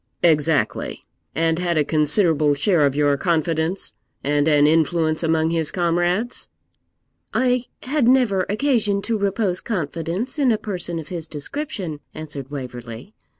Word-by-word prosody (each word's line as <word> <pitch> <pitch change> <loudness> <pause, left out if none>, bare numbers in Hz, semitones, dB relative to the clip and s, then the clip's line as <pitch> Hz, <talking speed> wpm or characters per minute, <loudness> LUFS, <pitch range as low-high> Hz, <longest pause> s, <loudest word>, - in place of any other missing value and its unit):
'Exactly 160 -3 +1 0.3
and 165 0 +1
had 175 -2 0
a 150 - +4
considerable 155 -1 +3
share 150 0 +3
of 140 - -3
your 145 -1 +3
confidence, 165 +2 0 0.3
and 145 +1 +1
an 150 -2 +5
influence 160 0 +2
among 160 -1 +1
his 165 -2 0
comrades?' 175 +6 0 0.9
'I 250 -1 +2 0.2
had 265 -2 +1
never 240 -8 +3
occasion 210 -4 +1
to 230 - -1
repose 200 -2 0
confidence 180 - -3
in 265 -4 +4
a 220 - +2
person 180 -5 -2
of 160 -2 -7
his 170 -3 -4
description,' 175 - -5 0.2
answered 145 -4 -7
Waverley. 125 - -8
165 Hz, 135 wpm, -22 LUFS, 150-200 Hz, 0.9 s, an